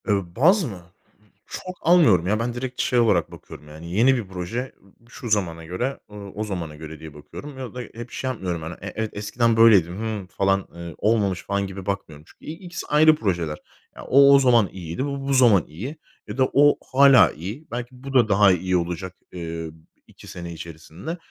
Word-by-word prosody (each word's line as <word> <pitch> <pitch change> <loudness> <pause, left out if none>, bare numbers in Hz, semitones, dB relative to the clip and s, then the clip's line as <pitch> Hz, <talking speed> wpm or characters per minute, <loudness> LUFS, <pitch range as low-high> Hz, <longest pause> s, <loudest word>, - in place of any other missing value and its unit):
Iıı, 100 -5 -1
baz 180 - +4
mı? 100 - -6 0.7
Çok 185 0 -7
almıyorum 150 - +4
ya 105 +2 +1
ben, 120 +1 -2
direkt 125 +1 -4
şey 125 - +1
olarak 100 -8 +2
bakıyorum. 75 - -12
Yani, 80 +3 -10
yeni 125 +7 +4
bir 115 -6 -4
proje, 95 +8 -5 0.4
şu 120 - -8
zamana 85 -6 -1
göre, 95 +11 -3
ııı, 100 -1 -9
o 105 - -2
zamana 90 -7 -5
göre 80 0 -10
diye 80 -2 -10
bakıyorum 75 - -10
ya 130 -3 -7
da 125 - -4
hep 120 +1 -10
şey 130 - -3
yapmıyorum. 90 -9 -3
Hani, 80 +2 -6
e - - -6
evet 110 -1 -2
eskiden 115 +3 0
böyleydim, 100 -6 +5
hımm, 110 -4 -4
falan, 95 +1 0
ııı, 85 -2 -8
olmamış 100 -4 +1
falan 100 0 -2
gibi 95 -1 -8
bakmıyorum. 80 -7 -5
Çünkü - - -19
i - - -5
ikisi 175 +1 -8
ayrı 155 +1 +5
projeler 85 - -2 0.4
ya - - -10
o, 140 +1 +7
o - - +6
zaman 120 -7 +4
iyiydi, 90 - -5
bu, 140 -1 -4
bu 140 - +1
zaman 120 -9 +5
iyi 115 - -7 0.3
ya - - -7
da 130 -1 +2
o 145 +1 +5 0.2
hâlâ 135 -2 +7
iyi. 105 - -8
Belki 120 0 -4
bu 135 0 -7
da, 120 -5 +4
daha 100 0 +5
iyi 90 0 +1
olacak. 90 +2 -4 0.2
Iıı, 80 -2 -6 0.3
2 - - -16
sene 85 -1 -7
içerisinde. 85 - -8
105 Hz, 195 wpm, -23 LUFS, 85-125 Hz, 0.7 s, o